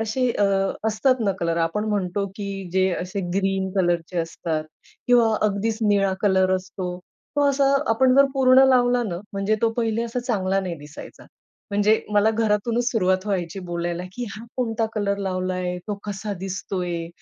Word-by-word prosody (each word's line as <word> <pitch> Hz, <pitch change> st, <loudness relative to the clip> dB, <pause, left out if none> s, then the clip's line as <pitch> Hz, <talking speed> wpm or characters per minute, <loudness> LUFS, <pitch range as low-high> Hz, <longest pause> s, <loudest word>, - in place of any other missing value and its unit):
असे 240 Hz, +3 st, 0 dB
अ, 205 Hz, -, +1 dB, 0.4 s
असतात 255 Hz, +4 st, +1 dB
ना, 195 Hz, -, +2 dB
कलर 170 Hz, 0 st, 0 dB
आपण 210 Hz, +6 st, -3 dB
म्हणतो 200 Hz, -1 st, -1 dB
की 195 Hz, -2 st, -5 dB
जे 190 Hz, 0 st, +3 dB
असे 185 Hz, +3 st, -4 dB, 0.2 s
ग्रीन 195 Hz, -1 st, 0 dB
कलरचे 175 Hz, -1 st, 0 dB
असतात 165 Hz, -1 st, -2 dB, 0.4 s
किंवा 235 Hz, -3 st, +4 dB
अगदीच 215 Hz, +2 st, -1 dB
निळा 195 Hz, -2 st, +3 dB
कलर 190 Hz, -2 st, +3 dB
असतो. 185 Hz, -1 st, -6 dB, 0.4 s
तो 285 Hz, 0 st, +4 dB
असा 275 Hz, 0 st, +3 dB, 0.2 s
आपण 255 Hz, +3 st, +4 dB
जर 275 Hz, -, +8 dB
पूर्ण 265 Hz, 0 st, +6 dB
लावला 245 Hz, -1 st, +3 dB
ना, 195 Hz, -7 st, -3 dB, 0.2 s
म्हणजे 195 Hz, +2 st, 0 dB
तो 230 Hz, -, +4 dB
पहिले 230 Hz, 0 st, 0 dB
असा 235 Hz, +1 st, -3 dB
चांगला 195 Hz, -5 st, 0 dB
नाही 180 Hz, -3 st, -4 dB
दिसायचा. 145 Hz, +1 st, -11 dB, 0.5 s
म्हणजे 205 Hz, +2 st, +3 dB
मला 210 Hz, +1 st, +4 dB
घरातूनच 225 Hz, +2 st, +1 dB
सुरुवात 185 Hz, -3 st, +1 dB
व्हायची 190 Hz, -1 st, -2 dB
बोलायला 175 Hz, 0 st, -2 dB
की 245 Hz, +5 st, -4 dB
"हा 220 Hz, +2 st, -9 dB
कोणता 225 Hz, -3 st, 0 dB
कलर 200 Hz, -2 st, 0 dB
लावलाय? 185 Hz, -2 st, -2 dB
तो 210 Hz, -, -1 dB
कसा 205 Hz, 0 st, -4 dB
दिसतोय?" 180 Hz, -3 st, -3 dB
200 Hz, 160 wpm, -23 LUFS, 185-225 Hz, 0.5 s, जर